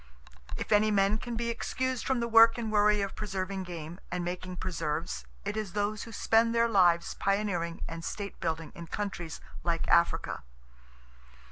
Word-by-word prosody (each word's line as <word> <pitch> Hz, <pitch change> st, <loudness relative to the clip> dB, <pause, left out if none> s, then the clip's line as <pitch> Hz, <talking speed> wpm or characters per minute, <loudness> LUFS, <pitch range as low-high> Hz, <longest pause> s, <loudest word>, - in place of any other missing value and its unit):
If -, -, -5 dB
any 215 Hz, +1 st, +5 dB
men 200 Hz, +1 st, +3 dB
can 240 Hz, 0 st, -5 dB
be 235 Hz, 0 st, -1 dB
excused 255 Hz, +2 st, -2 dB
from 260 Hz, -3 st, +1 dB
the 235 Hz, -, 0 dB
work 230 Hz, 0 st, +7 dB
and 225 Hz, -2 st, -3 dB
worry 210 Hz, 0 st, +4 dB
of 195 Hz, -1 st, -3 dB
preserving 190 Hz, -2 st, -3 dB
game, 170 Hz, 0 st, -7 dB
and 180 Hz, -1 st, -2 dB
making 180 Hz, +1 st, -4 dB
preserves, 165 Hz, -2 st, -3 dB, 0.2 s
it 205 Hz, +1 st, -2 dB
is 215 Hz, -4 st, -3 dB
those 210 Hz, +1 st, -1 dB
who 230 Hz, -, -10 dB
spend 225 Hz, +1 st, +3 dB
their 230 Hz, 0 st, +4 dB
lives 175 Hz, -6 st, +4 dB
pioneering 195 Hz, -4 st, -1 dB
and 165 Hz, 0 st, -6 dB
state 200 Hz, +3 st, -5 dB
building 160 Hz, -2 st, -2 dB
in 170 Hz, -3 st, -9 dB
countries 175 Hz, -4 st, -4 dB, 0.2 s
like 170 Hz, -1 st, 0 dB
Africa. 170 Hz, 0 st, +2 dB
200 Hz, 165 wpm, -30 LUFS, 175-215 Hz, 0.2 s, work